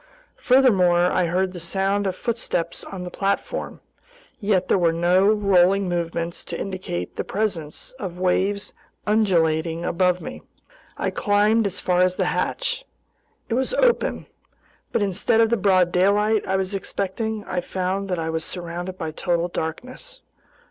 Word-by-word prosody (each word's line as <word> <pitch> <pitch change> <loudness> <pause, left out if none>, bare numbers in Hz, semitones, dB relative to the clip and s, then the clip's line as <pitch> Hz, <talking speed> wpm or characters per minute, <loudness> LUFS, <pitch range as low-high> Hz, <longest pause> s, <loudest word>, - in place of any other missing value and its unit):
Furthermore, 195 -10 +4
I 180 -2 +2
heard 185 +2 0
the 180 - -6
sound 195 +4 0
of 185 - -2
footsteps 185 -7 -2
on 190 -2 -7
the 180 - -6
platform. 200 - -2 0.6
Yet 200 -3 +1
there - - +3
were 170 -2 +3
no 175 +3 +3
rolling 195 -2 +3
movements 170 -1 -3
to 170 - -5
indicate 185 - -5
the - - -1
presence 190 -8 -3
of 185 -6 -5
waves 190 +2 0 0.3
undulating 170 -6 +1
above 180 0 +2
me. - - -8 0.6
I - - -1
climbed 210 +1 +2
as 195 - -3
far 180 -1 +1
as 185 0 +3
the - - 0
hatch. - - -1 0.6
It - - -2
was 265 - 0
open. - - +2 0.7
But 220 - +1
instead 200 +3 +1
of 225 0 +4
the - - +4
broad 185 -4 +3
daylight 205 +4 +2
I 190 - +1
was 190 +1 -1
expecting, 205 +3 -3
I 180 -2 -2
found 190 +2 -2
that 180 - 0
I 160 0 -2
was 160 0 -2
surrounded 175 +2 -6
by 160 -3 -4
total 175 +2 -1
darkness. 255 - -6
185 Hz, 155 wpm, -23 LUFS, 175-205 Hz, 0.7 s, Furthermore